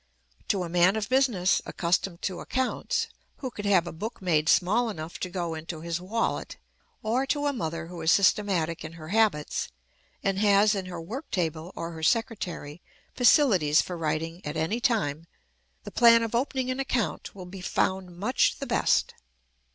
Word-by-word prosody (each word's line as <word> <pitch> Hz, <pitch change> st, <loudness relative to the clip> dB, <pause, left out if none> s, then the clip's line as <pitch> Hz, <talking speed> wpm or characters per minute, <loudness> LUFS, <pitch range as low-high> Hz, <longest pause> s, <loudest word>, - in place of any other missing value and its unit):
To 190 Hz, -2 st, +1 dB
a -, -, -4 dB
man 175 Hz, +3 st, +3 dB
of 220 Hz, -1 st, -2 dB
business, 250 Hz, -9 st, +3 dB
accustomed 175 Hz, +1 st, -1 dB
to 185 Hz, -2 st, -2 dB
accounts, 260 Hz, 0 st, -1 dB, 0.3 s
who 260 Hz, -3 st, -5 dB
could 205 Hz, -3 st, -7 dB
have 185 Hz, -4 st, +4 dB
a 175 Hz, -, -5 dB
book 215 Hz, +8 st, -6 dB
made 155 Hz, -5 st, +1 dB
small 220 Hz, +6 st, +3 dB
enough 165 Hz, -4 st, -7 dB
to 185 Hz, -, -3 dB
go 175 Hz, -2 st, -3 dB
into 160 Hz, 0 st, -6 dB
his 170 Hz, +1 st, -3 dB
wallet, 225 Hz, +5 st, -2 dB, 0.5 s
or 245 Hz, +5 st, 0 dB
to 290 Hz, +1 st, 0 dB
a 285 Hz, -, +1 dB
mother 165 Hz, -, -3 dB
who 170 Hz, 0 st, -8 dB
is 160 Hz, +1 st, +3 dB
systematic 190 Hz, -6 st, +2 dB
in 160 Hz, +1 st, -7 dB
her 160 Hz, -1 st, -10 dB
habits, 205 Hz, -8 st, +1 dB, 0.6 s
and 195 Hz, -1 st, 0 dB
has 205 Hz, +1 st, +5 dB
in 195 Hz, -2 st, -3 dB
her 175 Hz, -2 st, -6 dB
work 235 Hz, -, -7 dB
table 165 Hz, -1 st, -2 dB
or 165 Hz, 0 st, -5 dB
her 160 Hz, -1 st, -8 dB
secretary 175 Hz, -6 st, -1 dB, 0.3 s
facilities 215 Hz, -, +5 dB
for 180 Hz, -, -6 dB
writing 165 Hz, +2 st, -3 dB
at 150 Hz, +2 st, -4 dB
any 165 Hz, +9 st, 0 dB
time, 165 Hz, -10 st, 0 dB, 0.6 s
the -, -, -8 dB
plan 230 Hz, -1 st, +6 dB
of 225 Hz, -, -3 dB
opening 255 Hz, +1 st, 0 dB
an 255 Hz, -, -3 dB
account 250 Hz, -7 st, -2 dB
will 185 Hz, -2 st, -8 dB
be 185 Hz, +1 st, -9 dB
found 185 Hz, -1 st, -1 dB
much 215 Hz, +8 st, +1 dB
the -, -, -5 dB
best. -, -, +2 dB
185 Hz, 175 wpm, -27 LUFS, 165-225 Hz, 0.6 s, plan